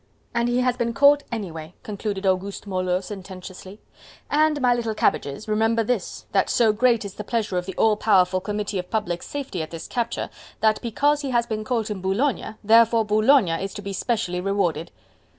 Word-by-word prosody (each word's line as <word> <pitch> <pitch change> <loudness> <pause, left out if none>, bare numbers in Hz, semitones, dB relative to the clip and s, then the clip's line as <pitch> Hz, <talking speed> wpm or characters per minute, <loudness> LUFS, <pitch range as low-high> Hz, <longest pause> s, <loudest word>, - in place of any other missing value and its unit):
"And 235 0 +1
he 245 +1 +2
has 250 -1 +1
been 235 -1 -1
caught 285 +1 +6
anyway," 170 -7 -6
concluded 205 -1 -4
Auguste 190 +2 -1
Moleux 185 -2 -1
sententiously, 190 0 -9 0.5
"and, 305 0 +3
my 250 -2 +4
little 230 -2 -2
cabbages, 140 -2 0
remember 225 +2 +2
this, 230 -2 -3
that - - +2
so 225 -3 +3
great 235 -1 +2
is 200 - -6
the 210 - -7
pleasure 215 -3 -2
of 180 - -8
the 190 - -5
all 220 -1 +4
powerful 185 -3 +3
Committee 205 0 -3
of 180 - -6
Public 195 -6 -2
Safety 275 - -5
at 155 - -5
this 165 -1 -7
capture, 235 -1 -3 0.3
that 215 -1 +2
because 290 +5 +1
he 280 - -3
has 240 -2 +2
been 215 -2 -3
caught 225 -2 -1
in 195 -3 -4
Boulogne, 220 +4 -1
therefore 225 +1 +5
Boulogne 215 -4 +3
is 195 0 -5
to 205 - -7
be 200 0 -5
specially 190 -5 -1
rewarded!" 180 -5 -1
215 Hz, 185 wpm, -23 LUFS, 190-235 Hz, 0.5 s, caught